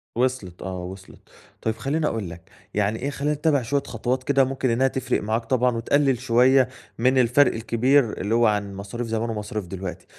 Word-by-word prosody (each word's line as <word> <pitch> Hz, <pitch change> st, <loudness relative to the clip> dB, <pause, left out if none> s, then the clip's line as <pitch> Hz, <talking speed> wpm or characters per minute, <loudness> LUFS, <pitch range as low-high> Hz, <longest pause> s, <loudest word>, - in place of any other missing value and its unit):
وصلِت 120 Hz, -8 st, -1 dB
آه 90 Hz, -1 st, -5 dB
وصلِت، 95 Hz, +1 st, -10 dB, 0.4 s
طيب 110 Hz, -1 st, -1 dB
خليني 150 Hz, +5 st, -1 dB
أقول 110 Hz, -9 st, -3 dB
لك، 85 Hz, 0 st, -12 dB, 0.2 s
يعني 105 Hz, +2 st, 0 dB
إيه 140 Hz, -, -2 dB
خلينا 145 Hz, +1 st, -1 dB
نتّبِع 150 Hz, -2 st, +1 dB
شوية 140 Hz, +4 st, -1 dB
خطوات 125 Hz, +3 st, -2 dB
كده 135 Hz, 0 st, +3 dB
ممكن 130 Hz, 0 st, -1 dB
إنها 125 Hz, +3 st, +3 dB
تفرق 130 Hz, -1 st, -1 dB
معاك 110 Hz, +2 st, -1 dB
طبعًا 125 Hz, 0 st, +2 dB
وتقلل 135 Hz, +2 st, +2 dB
شوية 130 Hz, +1 st, +4 dB, 0.3 s
من 130 Hz, +3 st, +3 dB
الفرق 130 Hz, +3 st, +4 dB
الكبير 120 Hz, +2 st, +2 dB
اللي 105 Hz, +4 st, 0 dB
هو 120 Hz, 0 st, +4 dB
عن 105 Hz, -2 st, -1 dB
مصاريف 100 Hz, +5 st, -5 dB
زمان 115 Hz, +1 st, -2 dB
ومصاريف 105 Hz, -2 st, -4 dB
دلوقتي، 95 Hz, 0 st, -6 dB
120 Hz, 185 wpm, -24 LUFS, 105-130 Hz, 0.4 s, شوية